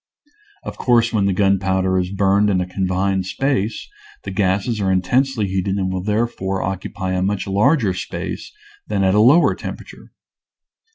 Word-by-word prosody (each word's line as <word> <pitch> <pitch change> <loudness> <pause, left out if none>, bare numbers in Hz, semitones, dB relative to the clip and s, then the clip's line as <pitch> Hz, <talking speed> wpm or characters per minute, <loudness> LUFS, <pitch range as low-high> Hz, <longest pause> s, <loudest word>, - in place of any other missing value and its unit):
Of - - -8
course 120 -2 +2
when 100 -3 +2
the - - +2
gunpowder 95 -1 +1
is 90 0 -2
burned 100 +1 +2
in 95 -2 +1
a 90 - -1
confined 95 0 -1
space 130 -2 -2 0.4
the - - -6
gases 100 +3 0
are 95 -1 +1
intensely 110 +5 +1
heated 95 0 -1
and 95 -1 -1
will 95 - -2
therefore 105 -2 -1
occupy 95 0 -4
a 90 0 0
much 100 +1 -1
larger 105 - +2
space 90 - -6 0.4
than 100 -2 0
at 95 0 +3
a 105 - +4
lower 135 +10 +5
temperature. - - -9
95 Hz, 160 wpm, -20 LUFS, 95-105 Hz, 0.4 s, lower